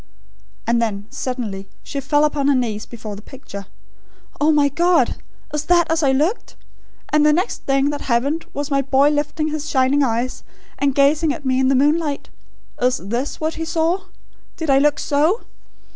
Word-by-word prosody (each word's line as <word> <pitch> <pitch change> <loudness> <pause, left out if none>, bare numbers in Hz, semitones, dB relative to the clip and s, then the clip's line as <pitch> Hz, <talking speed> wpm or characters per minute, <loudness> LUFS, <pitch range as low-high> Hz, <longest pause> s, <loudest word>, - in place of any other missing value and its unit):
And 235 0 +2
then, 205 -3 -2
suddenly; 220 -7 -4
she 280 - -4
fell 290 +2 +2
upon 290 -2 0
her 285 - +4
knees 225 -4 -2
before 220 -3 -7
the 200 - -10
picture. 200 -5 -10 0.7
"Oh, 300 +2 +4
my 295 -2 +4
God! 345 +5 +2 0.4
Is 300 0 -2
that 345 -1 +3
as 325 0 +2
I 280 -3 +3
looked? 310 - 0 0.5
And 300 0 +3
the 300 - +5
next 360 +9 -1
thing 275 +1 +2
that 290 - -5
happened 275 +7 0
was 285 0 -4
my 275 0 +3
boy 275 +1 +3
lifting 300 +1 -1
his 305 0 -4
shining 265 +2 +2
eyes 245 -1 -1 0.4
and 280 -2 +1
gazing 290 +3 +3
at 300 - -11
me 260 0 +2
in 265 - +3
the 270 - +3
moonlight. 295 +2 +1 0.5
Is 250 0 +2
THIS 235 +8 -4
what 315 +1 -1
he - - -1
saw? 335 +4 0 0.5
Did 320 -4 -1
I 270 - +5
look 295 +1 +3
SO? 310 +10 +1
285 Hz, 180 wpm, -20 LUFS, 255-305 Hz, 0.7 s, the